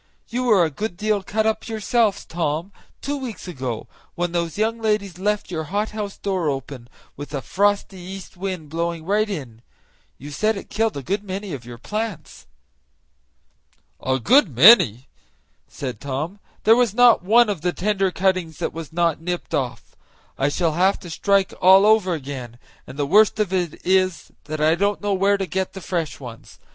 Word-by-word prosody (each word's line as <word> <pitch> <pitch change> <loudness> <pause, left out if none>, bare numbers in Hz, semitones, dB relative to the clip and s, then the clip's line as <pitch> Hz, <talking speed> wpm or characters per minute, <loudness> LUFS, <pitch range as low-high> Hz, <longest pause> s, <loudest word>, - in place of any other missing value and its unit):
You 250 +2 -2
were 205 -8 +5
a 160 - -3
good 205 +5 -4
deal 210 0 0
cut 215 +3 -1
up 220 0 -1
yourself, 220 -1 0
Tom, 165 +2 -2 0.3
two 285 +1 -2
weeks 245 -8 -7
ago, 130 -10 -4 0.3
when 175 0 -1
those 170 -2 -2
young 225 +2 0
ladies 210 -5 -1
left 205 -1 -1
your 160 -2 -3
hothouse 205 +2 -3
door 185 -6 -1
open, 135 -3 -6 0.3
with 145 +1 -7
a 135 - -2
frosty 200 -1 0
east 190 +2 -9
wind 180 -5 -5
blowing 165 0 -3
right 210 +3 +1
in; 130 - -6 0.6
you 145 +3 -9
said 215 +9 0
it - - -10
killed 225 -6 0
a 140 - -5
good 200 +9 -2
many 195 -1 -5
of 125 -4 -7
your 120 -1 -9
plants." 210 - -5 1.6
"A 130 0 +1
good 235 - +4
many!" 130 - +7 0.6
said 125 -6 -6
Tom; 145 +8 -4 0.2
"there 220 +1 +6
was 240 -4 +2
not 245 -4 +6
one 225 +6 +5
of 200 -7 -3
the 180 - 0
tender 195 +1 0
cuttings 185 -4 0
that - - -3
was 165 -2 -7
not 170 -2 0
nipped 175 +1 -4
off. 125 -3 -3 0.4
I 135 - +1
shall 165 +2 0
have 185 +5 +2
to 175 - -9
strike 195 +2 +1
all 190 +2 +7
over 210 -5 +4
again, 130 -5 -7 0.3
and 130 - -10
the 145 - 0
worst 215 +7 +4
of 200 -3 0
it 175 -4 -1
is 185 -2 +1
that 155 +1 -5
I 155 +1 +4
don't 200 +4 0
know 205 -1 0
where 200 +1 +2
to 195 - -2
go 190 +2 -1
to - - -31
get 190 - -8
fresh 165 -6 -3
ones. 120 -4 -11
185 Hz, 185 wpm, -22 LUFS, 155-210 Hz, 1.6 s, many